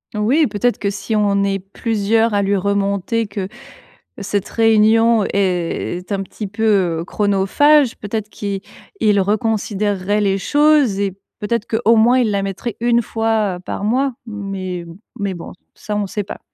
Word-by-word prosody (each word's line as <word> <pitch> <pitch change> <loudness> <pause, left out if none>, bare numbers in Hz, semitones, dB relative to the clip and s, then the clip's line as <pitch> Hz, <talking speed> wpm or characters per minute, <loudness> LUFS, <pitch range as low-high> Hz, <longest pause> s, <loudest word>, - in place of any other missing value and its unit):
Oui 255 +9 +2
peut-être 225 +3 0
que 200 - -1
si 205 +2 -3
on 200 -1 +2
est 195 0 0
plusieurs 220 +3 0
à 205 - +2
lui 200 +1 +1
remonter 200 +3 0
que 200 -2 -5 0.7
cette 200 0 -2
réunion 225 0 +4
est 180 -1 -1
un 195 -1 -1
petit 205 +2 -7
peu, 195 -5 +1
heu, - - -6
chronophage, 215 +9 +3
peut-être 215 0 -4
qu'il 200 -2 -4 0.4
il 210 -2 +3
reconsidérerait 205 -1 0
les 195 -1 +1
choses 290 -2 +3
et 195 -2 -2 0.2
peut-être 220 +1 -1
qu'au 230 0 +3
moins 240 +3 +4
il 230 -4 +1
la 200 -1 0
mettrait 195 +4 -4
1 235 0 +3
fois 220 -4 -1
par - - -4
mois, 260 +5 +1
mais 195 -5 -5 0.3
mais 200 -3 -2
bon, 175 - -9 0.2
ça 210 - -5
on 205 0 0
sait 205 +2 -3
pas. 200 - -8
205 Hz, 155 wpm, -18 LUFS, 195-225 Hz, 0.7 s, réunion